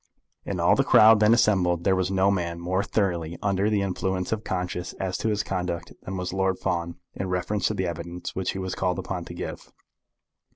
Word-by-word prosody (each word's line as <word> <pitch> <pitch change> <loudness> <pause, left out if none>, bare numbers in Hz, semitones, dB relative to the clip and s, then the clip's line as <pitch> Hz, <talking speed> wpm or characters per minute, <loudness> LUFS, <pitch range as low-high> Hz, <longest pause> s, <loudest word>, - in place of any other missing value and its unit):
In - - -3
all - - +4
the - - +3
crowd 110 0 +7
then 105 +1 +5
assembled 95 -7 +3
there 95 +1 +3
was 95 -1 0
no 95 +1 +3
man 85 -3 -2
more 90 +3 0
thoroughly 85 -6 -1
under 100 0 +1
the 105 -2 +1
influence 95 -1 -2
of 110 -1 -1
conscience 90 -2 -3
as 95 -1 -3
to 110 - 0
his 105 -1 0
conduct 90 -3 -3
than 95 +1 -5
was 90 0 -3
Lord 95 -1 +1
Fawn 85 -1 -2 0.2
in 95 -1 -4
reference 90 +2 0
to 110 - -2
the 95 -1 -1
evidence 85 +1 -5
which 95 -1 -1
he - - -5
was 95 -1 -3
called 90 -2 -1
upon 90 -2 -4
to 85 - -9
give. - - -7
95 Hz, 210 wpm, -26 LUFS, 90-100 Hz, 0.2 s, crowd